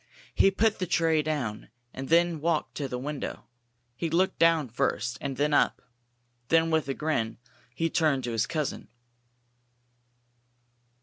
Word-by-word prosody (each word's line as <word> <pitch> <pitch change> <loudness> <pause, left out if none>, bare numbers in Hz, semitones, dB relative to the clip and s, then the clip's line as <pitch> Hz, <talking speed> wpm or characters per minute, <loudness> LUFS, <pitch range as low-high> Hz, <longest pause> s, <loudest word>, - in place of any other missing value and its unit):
He - - +5
put 215 +3 +1
the 185 - -2
tray 165 -2 +2
down, 145 -11 -3 0.2
and 135 +1 -6
then 170 -1 +3
walked 160 -1 0
to 140 - -2
the 125 - -4
window. 145 +3 -5 0.5
He 165 +6 -2
looked 180 +4 +1
down 165 -5 +4
first, 125 0 -1
and 135 -2 -4
then 145 +1 +1
up. - - +3 0.7
Then 165 +2 +3
with 160 -4 +1
a 135 - -1
grin, 115 -8 -1 0.4
he 165 - 0
turned 155 -5 +1
to 120 - -3
his 115 -1 0
cousin. 150 -4 -3
155 Hz, 145 wpm, -28 LUFS, 135-165 Hz, 0.7 s, He